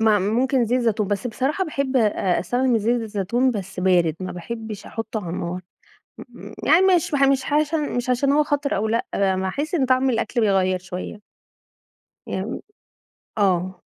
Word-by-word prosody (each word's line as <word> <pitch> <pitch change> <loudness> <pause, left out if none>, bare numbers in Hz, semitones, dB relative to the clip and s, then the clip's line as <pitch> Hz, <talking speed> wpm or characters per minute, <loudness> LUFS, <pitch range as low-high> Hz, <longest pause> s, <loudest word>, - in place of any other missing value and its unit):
ما 220 -2 +4
ممكن 240 +6 +1
زيت 250 +3 +1
زيتون، 220 -4 0
بس 205 +4 -1
بصراحة 265 - -1
باحب 275 -4 -2
آآ 205 -6 +2
أستخدم 245 +8 +1
الزيت 230 +2 +1
الزيتون 225 +4 0
بس 195 -4 -5
بارد، 175 -4 +3
ما 185 - -4
باحبش 220 +3 -7
أحطّه 225 -1 -4
على 165 - -4
النار، 180 +1 -4 0.6
م - - -11
يعني 335 - +6 0.2
مش 330 - -1
باح 285 -2 +1
مش 270 -1 +2
عش 305 +1 +2
مش 255 -5 -1
عشان 275 +3 +2
هو 300 +1 +4
خطر 290 -1 -1
أو 215 +3 0
لأ، 230 +1 0
ب - - -1
ما 190 -1 +1
احس 295 - -3
إن 275 -6 +2
طعم 255 +1 +3
الأكل 235 +1 -1
بيغيّر 190 -3 +2
شوية. 185 +3 -7 1.1
يعني - - -4 0.8
آه، 185 -2 +1
225 Hz, 170 wpm, -22 LUFS, 190-260 Hz, 1.1 s, يعني